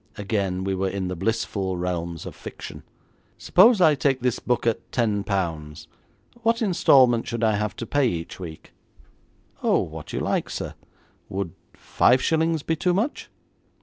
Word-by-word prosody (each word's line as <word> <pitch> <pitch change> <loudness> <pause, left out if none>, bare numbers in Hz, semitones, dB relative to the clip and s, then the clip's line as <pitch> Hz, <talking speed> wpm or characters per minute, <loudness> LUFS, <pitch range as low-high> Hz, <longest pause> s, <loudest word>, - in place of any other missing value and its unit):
Again 100 -3 -1
we 95 0 -1
were 95 0 -1
in 95 -1 -3
the 90 - -3
blissful 95 -1 -1
realms 85 -2 -3
of - - -8
fiction! - - -9 0.6
'Suppose 230 -2 +5
I 155 -3 +6
take 135 -2 +1
this 125 -1 0
book 125 -1 -1
at 115 -2 -1
ten 105 -5 0
pounds, 80 -7 -3 0.5
what 230 +1 +2
instalment 130 - +4
should 115 0 -3
I 110 -2 +3
have 105 -1 -2
to 115 - -5
pay 140 +3 +2
each 85 -5 -4
week?' 80 -4 -9 0.9
'Oh, - - +3
what - - -7
you - - -2
like, - - -1
sir. - - -5 0.6
Would 95 -3 -3 0.2
five 125 +2 +3
shillings 160 +1 +1
be 165 - 0
too 175 +3 +1
much?' 230 +9 -2
110 Hz, 160 wpm, -24 LUFS, 95-135 Hz, 0.9 s, I